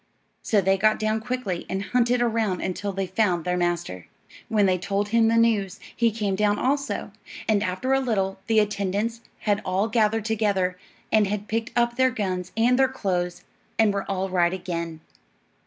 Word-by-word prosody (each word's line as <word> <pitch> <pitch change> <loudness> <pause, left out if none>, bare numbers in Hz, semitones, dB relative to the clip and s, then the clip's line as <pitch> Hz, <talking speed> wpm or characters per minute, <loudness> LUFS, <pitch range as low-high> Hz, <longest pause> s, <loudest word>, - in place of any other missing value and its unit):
So 210 -3 +2
they 195 +1 +2
got 215 +2 +4
down 215 0 0
quickly 245 -7 -3
and 190 +1 -2
hunted 245 +2 +2
around 220 -5 0
until 200 +2 -3
they 195 0 -2
found 185 -3 0
their 180 0 0
master. 175 - -2 0.4
When 210 -2 +3
they 185 -1 +2
told 200 +3 -1
him 230 0 +4
the 230 0 +3
news, 215 -4 +2 0.2
he 235 -1 +3
came 210 -3 -1
down 205 +1 +2
also; 280 +4 -1 0.4
and 215 -2 +3
after 215 +7 -1
a 270 - +4
little 195 -7 -1
the 225 -1 +2
attendants 210 +2 0 0.2
had 205 -1 +1
all 190 +3 0
gathered 220 -1 +1
together 205 -5 +1 0.4
and 215 -2 +4
had 205 +1 -3
picked 225 +1 -2
up 235 0 +1
their 260 0 +4
guns 190 -6 -3
and 245 +3 +3
their 265 - +5
clothes, 180 -8 -2 0.3
and 220 -2 +4
were 200 0 -3
all 190 -1 -1
right 180 -1 +2
again. 170 -3 -4
205 Hz, 180 wpm, -25 LUFS, 185-225 Hz, 0.4 s, their